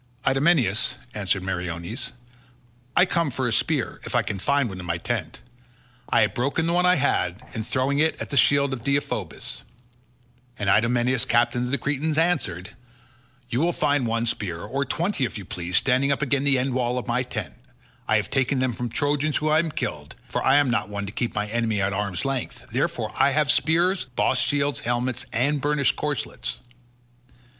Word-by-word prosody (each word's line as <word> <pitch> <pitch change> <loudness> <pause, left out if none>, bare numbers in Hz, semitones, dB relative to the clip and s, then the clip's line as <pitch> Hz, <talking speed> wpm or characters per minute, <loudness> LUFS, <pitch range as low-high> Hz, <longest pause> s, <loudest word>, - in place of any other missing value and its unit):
"Idomeneus," 135 - +2 0.2
answered 95 -2 0
Meriones, 90 +5 -4 0.8
"I 180 - +6
come 170 -4 0
for 130 -1 -2
a 115 - 0
spear, - - 0
if - - -5
I - - +3
can 100 - -4
find 140 +5 +2
one 95 -3 -7
in 90 - -7
my 85 0 0
tent; 75 -6 -3 0.7
I - - +4
have - - +2
broken 140 +6 0
the 170 - +1
one 180 +1 +3
I 180 - +5
had, 100 - +1
in 110 - -3
throwing 130 +5 0
it 160 +1 +2
at - - -5
the - - -1
shield 140 -1 +4
of 120 -3 -6
Deiphobus." 140 +2 -2 1.0
And 100 -2 +1
Idomeneus 120 +3 +2
captain 120 0 +2
of - - -3
the 140 - +1
Cretans 150 +3 -1
answered, 120 - 0 0.7
"You 120 - -1
will 170 +2 +3
find 145 -5 +1
one 115 +1 0
spear, 95 -7 -2
or 140 +1 -2
twenty 170 -1 -1
if 120 - -2
you 100 - -7
so - - -18
please, 90 0 -1
standing 135 +2 +3
up 140 - 0
against 140 0 0
the 140 -2 +4
end 130 +1 0
wall 125 0 0
of 125 - -3
my 120 +1 0
tent. 125 - -4 0.5
I - - +3
have - - 0
taken 135 0 +1
them 130 -1 +1
from 120 +1 -4
Trojans 145 +4 0
whom 155 - 0
I 155 - +4
have 160 -1 0
killed, 75 -1 -4
for - - -2
I 135 - +4
am 145 -3 +4
not 120 - 0
one 100 0 -4
to 100 - -6
keep 120 +2 -3
my 105 0 0
enemy 110 -1 0
at 100 +1 0
arm's 100 +2 -2
length; 135 -2 -3
therefore - - -1
I - - +5
have 145 0 +3
spears, 175 +4 +2
bossed 130 - +2
shields, 145 0 +1
helmets, 120 +1 -2
and 140 +5 +1
burnished 145 -2 +2
corslets." 150 -4 -3
130 Hz, 195 wpm, -24 LUFS, 110-145 Hz, 1.0 s, I